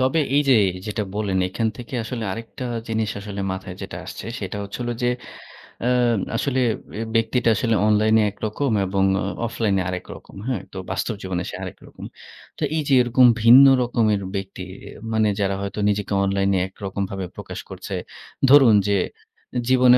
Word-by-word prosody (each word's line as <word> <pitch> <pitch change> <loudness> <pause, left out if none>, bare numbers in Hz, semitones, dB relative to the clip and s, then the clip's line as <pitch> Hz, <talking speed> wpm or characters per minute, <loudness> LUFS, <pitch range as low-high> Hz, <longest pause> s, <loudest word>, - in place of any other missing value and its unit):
তবে 130 +5 +2 0.2
এই 145 - +5
যে 130 - +7 0.3
যেটা 105 +1 -2
বলেন 100 -3 0
এখান 110 +4 -1
থেকে 120 +1 -8
আসলে 115 0 -4
আরেকটা 115 +4 -7 0.2
জিনিস 110 -1 0
আসলে 100 -1 -6
মাথায় 95 -1 -6
যেটা 95 -3 -6
আসছে - - -8
সেটা 100 0 -5
হচ্ছে 100 - -7
হল 120 - -2
যে 120 - +3 0.7
অ্যা 120 - +1 0.5
আসলে 130 0 0 0.4
অ্যা 110 +2 -3
ব্যক্তিটা 115 +1 +2
আসলে 115 +1 +1
অনলাইনে 110 +1 +4
একরকম 110 +6 -2
এবং 95 +1 0 0.2
অ - - -2 0.2
অফলাইনে 105 -4 0
আরেকরকম। 90 +1 -7
হ্যাঁ? 125 -8 -1
তো - - -7
বাস্তব 115 - -1
জীবনে 90 -1 -3
সে - - -6
আরেকরকম। - - -10 0.5
তো - - -4
এই 160 - +1
যে 140 - +2
এরকম 125 +1 +4 0.2
ভিন্ন 125 +4 +9 0.2
রকমের 110 -4 +1
ব্যক্তি 95 -1 -5 0.5
মানে 110 -1 +3
যারা 100 -1 +1
হয়তো 100 +1 -4
নিজেকে 105 0 -1
অনলাইনে 100 0 +1
একরকমভাবে 95 0 -4
প্রকাশ - - -7
করছে। - - -6 0.5
ধরুন 135 -6 +8
যে 100 -1 +3 0.7
জীবনে 125 -1 +6
110 Hz, 160 wpm, -22 LUFS, 100-120 Hz, 0.7 s, ভিন্ন